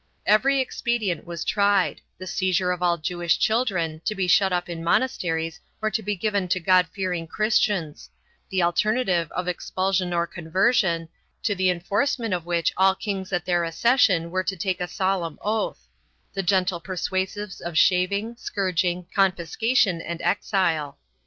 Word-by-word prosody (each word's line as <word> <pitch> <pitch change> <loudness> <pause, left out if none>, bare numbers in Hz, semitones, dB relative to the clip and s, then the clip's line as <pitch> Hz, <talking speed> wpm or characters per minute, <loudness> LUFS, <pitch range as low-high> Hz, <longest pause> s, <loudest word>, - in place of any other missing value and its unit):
Every 270 +7 +4
expedient 235 - -1
was 170 -1 -5
tried 200 -2 +2
— - - -48
the 185 - -8
seizure 185 0 0
of 180 -1 -3
all 175 -1 +2
Jewish 170 +1 0
children, 180 -9 0
to 215 - -1
be 190 -1 0
shut 190 +2 +4
up 175 -1 -1
in 170 -1 -6
monasteries 165 -6 0 0.2
or 215 0 -1
to 215 - -1
be 205 0 -2
given 200 -1 -1
to 185 - +1
God 180 0 +4
fearing 180 -3 -3
Chris 215 +5 +2
tians; 165 -8 -2 0.4
the 190 -2 +1
alternative 180 -1 +1
of 180 0 -3
expulsion 185 +1 -1
or 170 -1 +1
conversion, 175 0 +1 0.4
to 205 - +1
the 185 -1 +1
enforce 200 +11 0
ment 225 -5 -3
of 175 -2 -3
which 170 -2 +1
all 190 0 +4
kings 195 -2 -4
at 180 -3 -1
their 175 -1 +1
accession 175 -1 +2
were 185 +1 0
to 190 +1 -3
take 185 0 -2
a 180 - -1
solemn 185 -4 -1
oath; 205 - -2 0.5
the 195 - -1
gentle 185 -1 +1
persuasives 190 +2 -3
of 170 -2 -4
shaving, 200 +7 +2
scourging, 180 -4 -1
confiscation 195 +1 +2
and 170 0 -5
exile. 170 -5 0
185 Hz, 165 wpm, -24 LUFS, 170-200 Hz, 0.5 s, Every